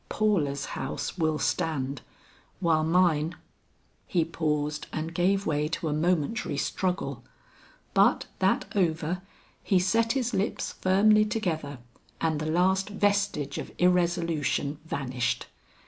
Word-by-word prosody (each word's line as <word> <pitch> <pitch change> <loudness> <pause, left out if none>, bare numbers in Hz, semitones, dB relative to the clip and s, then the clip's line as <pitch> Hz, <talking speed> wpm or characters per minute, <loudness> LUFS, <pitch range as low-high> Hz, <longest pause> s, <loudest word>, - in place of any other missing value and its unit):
Paula's 155 -10 +1
house 135 - -4
will 155 -1 +2
stand, 140 -3 -1 0.6
while 160 -3 +2
mine 165 -1 +2 0.4
" - - -39 0.3
He 170 -3 +1
paused 150 -2 -2
and 160 +1 -4
gave 190 +3 +2
way 150 -1 0
to 160 0 -2
a - - 0
momentary 170 +6 0
struggle, 185 -2 -2 0.7
but - - +4
that - - +2
over, 170 -1 0 0.4
he 195 - +3
set 225 +5 +2
his 250 -3 -1
lips 200 +3 -1
firmly 210 +3 +5
together 175 - -2 0.4
and 160 -2 0
the 155 - -3
last 190 +4 +2
vestige 200 -8 0
of - - -6
irresolution 170 -5 +1
vanished. 130 -5 -2
165 Hz, 120 wpm, -27 LUFS, 150-190 Hz, 0.7 s, firmly